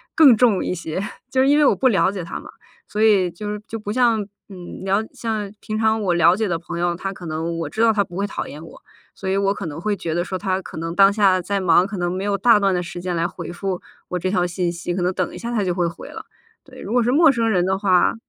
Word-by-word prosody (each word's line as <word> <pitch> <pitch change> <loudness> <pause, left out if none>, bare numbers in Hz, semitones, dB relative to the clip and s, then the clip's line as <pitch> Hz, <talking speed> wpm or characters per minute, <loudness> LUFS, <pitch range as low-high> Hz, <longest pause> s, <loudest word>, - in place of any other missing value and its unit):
更 280 -7 +8
重 215 -4 +3
一 - - -1
些， 165 +1 -4 0.3
就 260 - +2
是 265 - +3
因 290 +1 +4
为 300 - +4
我 - - +4
不 265 - +2
了 195 -4 +3
解 190 -4 -5
他 170 - -6
嘛， - - -12 0.4
所 210 - -3
以 195 -5 +4
就 210 +3 -5
就 225 +1 -8
不 210 0 -4
像， 235 -3 +3 0.3
嗯， 180 -1 -9
了 195 +3 +1
像 215 -3 -3
平 215 0 -4
常 220 0 +2
我 185 -3 +1
了 170 +1 +5
解 220 +1 -1
的 170 -3 -1
朋 170 0 -6
友， 175 0 0
他 195 +2 -4
可 180 - -11
能 165 +1 -3
我 160 - -3
知 220 - -3
道 225 -1 +5
他 205 -1 +2
不 175 -1 -10
会 200 +1 -1
讨 - - -5
厌 150 - -9
我， - - -14 0.3
所 190 - -5
以 195 - +1
我 200 0 +2
可 - - -6
能 150 +1 -6
会 210 +3 -1
觉 165 -4 -4
得 175 +1 0
说 185 0 -3
他 190 -1 -1
可 - - -11
能 165 +1 -4
当 195 0 +6
下 195 -3 +3
在 200 +3 -2
忙， 180 +1 +4
可 205 - -6
能 175 -1 -1
没 185 +2 -3
有 200 -1 0
大 230 -2 +5
段 195 -2 +2
的 180 - -1
时 175 0 -7
间 180 0 -3
来 165 - 0
回 - - -8
复 185 0 -3 0.3
我 180 - -2
这 185 +2 -1
条 180 -2 +1
信 175 0 -1
息， 175 +1 -4
可 180 - -2
能 180 +1 0
等 - - -2
一 - - -8
下 235 +1 -5
他 215 -4 +1
就 180 -2 0
会 175 -1 0
回 170 - -8
了。 - - -9 0.4
对， 260 -2 -13
如 205 - -7
果 245 0 +3
是 235 - +1
陌 310 +1 +6
生 230 -3 0
人 180 -4 +2
的 190 0 0
话。 185 -1 +3
195 Hz, 310 characters per minute, -21 LUFS, 175-215 Hz, 0.4 s, 更